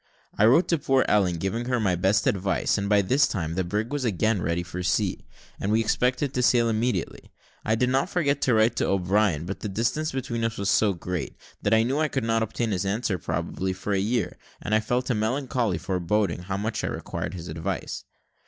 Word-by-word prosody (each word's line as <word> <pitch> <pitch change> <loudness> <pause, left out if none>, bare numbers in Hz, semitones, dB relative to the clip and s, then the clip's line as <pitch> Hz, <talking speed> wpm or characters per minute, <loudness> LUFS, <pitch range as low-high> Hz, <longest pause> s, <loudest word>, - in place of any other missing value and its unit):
I 105 - +5
wrote 135 +10 +5
to 170 - +2
poor 135 -1 +2
Ellen, 95 -4 +3
giving 95 +8 -2
her 125 -1 0
my 100 -4 +1
best 95 +6 +2
advice; 95 0 +1
and 100 -1 -2
by 105 -1 +4
this 130 +8 +3
time 80 -6 -3
the 95 +2 0
brig 105 +8 -2
was 145 -2 -1
again 110 -2 +1
ready 85 +2 -1
for 90 +1 -6
sea, 95 +2 0 0.3
and 100 - -1
we 110 - +3
expected 125 +4 +1
to 125 - 0
sail 120 -1 +4
immediately. 115 +3 -2 0.3
I 110 - +1
did 125 +2 +1
not 135 +1 +1
forget 145 -5 0
to 125 - +3
write 110 +2 +3
to - - +1
O'Brien, 95 -3 +1
but 95 +3 -5
the 105 - -4
distance 120 +10 -1
between 120 -3 -3
us 115 0 -1
was 100 0 0
so 105 -3 +3
great, 90 0 -4 0.3
that 100 +2 +3
I 110 - +4
knew 135 +5 0
I 155 - +2
could 135 -4 -2
not 115 0 +1
obtain 110 +1 -1
his 95 0 0
answer, 100 -1 -1
probably, 95 +4 -2
for 100 +2 -3
a 95 - +2
year, 110 +1 -1 0.2
and 110 - -3
I 110 - +5
felt 125 +4 -1
a - - +3
melancholy 120 - 0
foreboding, 90 +1 -1
how 95 +2 -3
much 105 +1 -2
I - - 0
required - - -4
his 85 -1 -7
advice. 80 +1 -4
110 Hz, 220 wpm, -25 LUFS, 95-120 Hz, 0.3 s, I